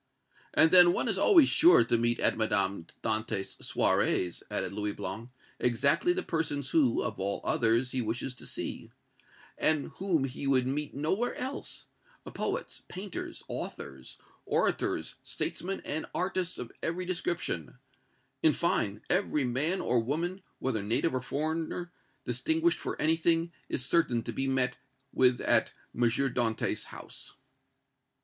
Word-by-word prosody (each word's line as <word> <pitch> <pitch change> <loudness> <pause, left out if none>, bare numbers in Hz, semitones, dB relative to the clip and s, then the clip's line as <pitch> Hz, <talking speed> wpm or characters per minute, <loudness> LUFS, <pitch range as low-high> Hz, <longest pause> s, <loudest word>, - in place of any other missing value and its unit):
"And 160 - +6
then 175 -1 +8
one - - -1
is - - 0
always 335 - +6
sure 355 +4 +6
to - - +1
meet 120 0 +1
at - - +3
Madame 100 -5 +1 0.2
Dantès' 110 -2 -2
soirées," 90 -2 +1
added - - -2
Louis 105 -1 -2
Blanc, 115 +2 -6 0.3
"exactly 140 - +2
the 370 +1 -1
persons 145 -4 -2
who, 140 -8 +3
of - - -4
all 100 +1 -1
others, 115 +2 +2
he 130 - 0
wishes 120 +3 -2
to 125 - -9
see, - - -4 0.7
and 155 -2 +2
whom 180 -7 +1
he 135 +1 -4
would 130 -2 +3
meet 145 +2 -3
nowhere 190 - -1
else, 265 +2 -5 0.5
poets, - - -3
painters, 190 +1 -6
authors, 65 -1 -7 0.3
orators, - - 0
statesmen 195 +2 -3
and 155 +2 -2
artists 185 0 -1
of 120 - -6
every 175 +2 -2
description 175 -6 -2 0.6
in 155 - +5
fine, 105 -12 0
every 175 -6 +1
man 140 +9 0
or 120 0 +2
woman, 165 +10 -2 0.2
whether 120 -5 -1
native 115 +10 +1
or 130 - -1
foreigner, 160 +6 -3 0.3
distinguished 160 +8 +1
for - - -4
anything, 165 +1 +2 0.2
is 130 - 0
certain 125 -9 +2
to - - -5
be 135 - -1
met 130 -1 +1 0.4
with 125 -1 +3
at - - +2 0.2
M. 120 - -5
Dantès' 120 -1 +1
house." - - -10
140 Hz, 140 wpm, -30 LUFS, 120-170 Hz, 0.7 s, then